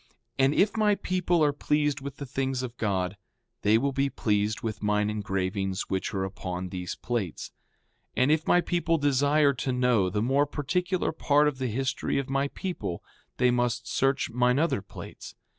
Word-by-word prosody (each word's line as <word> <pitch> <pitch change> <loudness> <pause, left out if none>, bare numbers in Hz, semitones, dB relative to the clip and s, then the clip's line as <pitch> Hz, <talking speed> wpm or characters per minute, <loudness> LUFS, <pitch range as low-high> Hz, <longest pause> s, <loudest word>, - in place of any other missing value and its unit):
And 135 +2 +4
if 210 +3 +3
my 210 -2 +3
people 180 -3 +1
are 145 -1 +3
pleased 150 -1 0
with 140 0 -7
the 140 - -6
things 135 -1 -2
of 125 -1 -6
God 95 -2 -1 0.4
they 105 +2 +4
will 140 +4 0
be 140 +1 0
pleased 105 -3 0
with 110 -2 -4
mine 105 0 +1
engravings 95 -2 -2
which 95 -1 -1
are 95 -1 -1
upon 95 -1 -4
these 90 -1 -5
plates. 115 -9 -3 0.7
5:33 - - +4
And 140 - +3
if 155 0 +1
my 175 - +5
people 170 -1 0
desire 145 0 +3
to 130 +1 -2
know 125 -6 +2
the 105 +3 -1
more 140 +4 +2
particular 175 +6 -1
part 150 -1 +3
of 140 -3 -2
the 130 - -1
history 130 +4 -1
of 135 0 -2
my 135 +1 +1
people 170 - -5 0.3
they 125 0 +4
must 120 0 0
search 135 +1 +1
mine 125 +1 +2
other 145 -8 +1
plates. - - -10
130 Hz, 180 wpm, -27 LUFS, 105-145 Hz, 0.7 s, my